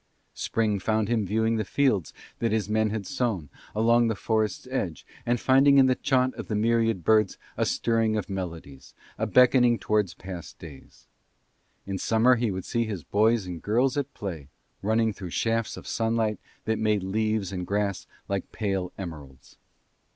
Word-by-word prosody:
Spring 110 Hz, -3 st, 0 dB
found 110 Hz, +2 st, 0 dB
him 110 Hz, -4 st, +1 dB
viewing 110 Hz, +3 st, +1 dB
the 110 Hz, -, 0 dB
fields 105 Hz, -, +1 dB, 0.3 s
that 115 Hz, -2 st, 0 dB
his 110 Hz, -3 st, 0 dB
men 110 Hz, 0 st, +1 dB
had 105 Hz, -2 st, -3 dB
sown, 115 Hz, -, -2 dB, 0.3 s
along 115 Hz, +2 st, +4 dB
the 110 Hz, -, 0 dB
forest's 110 Hz, +2 st, -1 dB
edge, 95 Hz, -11 st, -3 dB, 0.2 s
and 120 Hz, 0 st, +2 dB
finding 135 Hz, +2 st, +5 dB
in 135 Hz, -, +7 dB
the 130 Hz, -, +4 dB
chaunt 130 Hz, 0 st, +1 dB
of -, -, -6 dB
the 110 Hz, -, -2 dB
myriad 115 Hz, -3 st, +1 dB
birds 110 Hz, +1 st, +3 dB, 0.2 s
a -, -, 0 dB
stirring 115 Hz, -2 st, +1 dB
of 105 Hz, -, -3 dB
memories, 85 Hz, -8 st, -7 dB, 0.2 s
a -, -, 0 dB
beckoning 125 Hz, -1 st, +5 dB
towards 105 Hz, -6 st, 0 dB
past 90 Hz, -2 st, -8 dB
days. 75 Hz, -5 st, -13 dB, 0.8 s
In 95 Hz, -1 st, -4 dB
summer 115 Hz, +3 st, +4 dB
he 115 Hz, -1 st, 0 dB
would 95 Hz, -2 st, -4 dB
see 115 Hz, -1 st, 0 dB
his 100 Hz, -7 st, -5 dB
boys 110 Hz, +2 st, +2 dB
and 90 Hz, -3 st, -6 dB
girls 125 Hz, -, +1 dB
at 145 Hz, -1 st, -2 dB
play, 85 Hz, -9 st, -6 dB, 0.3 s
running 110 Hz, +1 st, +1 dB
through 95 Hz, -2 st, -7 dB
shafts 115 Hz, +5 st, -1 dB
of -, -, -10 dB
sunlight 115 Hz, -1 st, 0 dB, 0.3 s
that 110 Hz, 0 st, 0 dB
made 105 Hz, -3 st, +1 dB
leaves 110 Hz, 0 st, -1 dB
and 90 Hz, -2 st, -4 dB
grass 100 Hz, -1 st, -1 dB, 0.2 s
like 100 Hz, -1 st, -3 dB
pale 95 Hz, -4 st, -2 dB
emeralds. 75 Hz, -8 st, -9 dB
110 Hz, 170 wpm, -26 LUFS, 95-115 Hz, 0.8 s, in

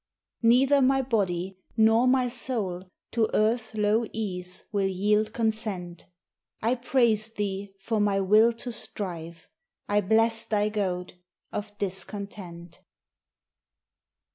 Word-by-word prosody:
Neither 265 Hz, +4 st, +5 dB
my 270 Hz, +1 st, +3 dB
body 190 Hz, -6 st, -1 dB, 0.2 s
nor 225 Hz, +3 st, +5 dB
my 255 Hz, -1 st, +3 dB
soul 210 Hz, -7 st, -3 dB, 0.2 s
To 225 Hz, -2 st, +1 dB
earth's 220 Hz, +1 st, +1 dB
low 210 Hz, +2 st, +2 dB
ease 180 Hz, -4 st, -4 dB
will 200 Hz, -2 st, +1 dB
yield 210 Hz, +3 st, +1 dB
consent. 215 Hz, -6 st, -2 dB, 0.5 s
I 230 Hz, +3 st, +1 dB
praise 240 Hz, -3 st, +2 dB
Thee 200 Hz, -2 st, -4 dB
for 215 Hz, +3 st, -2 dB
my 205 Hz, -1 st, +2 dB
will 215 Hz, +4 st, +5 dB
to 235 Hz, +2 st, -6 dB
strive. 170 Hz, -6 st, -6 dB, 0.4 s
I 205 Hz, 0 st, +2 dB
bless 225 Hz, +3 st, +3 dB
Thy 210 Hz, -1 st, +1 dB
goad 180 Hz, -4 st, -3 dB, 0.3 s
of 205 Hz, 0 st, -6 dB
discontent. 190 Hz, -3 st, -5 dB
210 Hz, 115 wpm, -27 LUFS, 190-225 Hz, 0.5 s, Neither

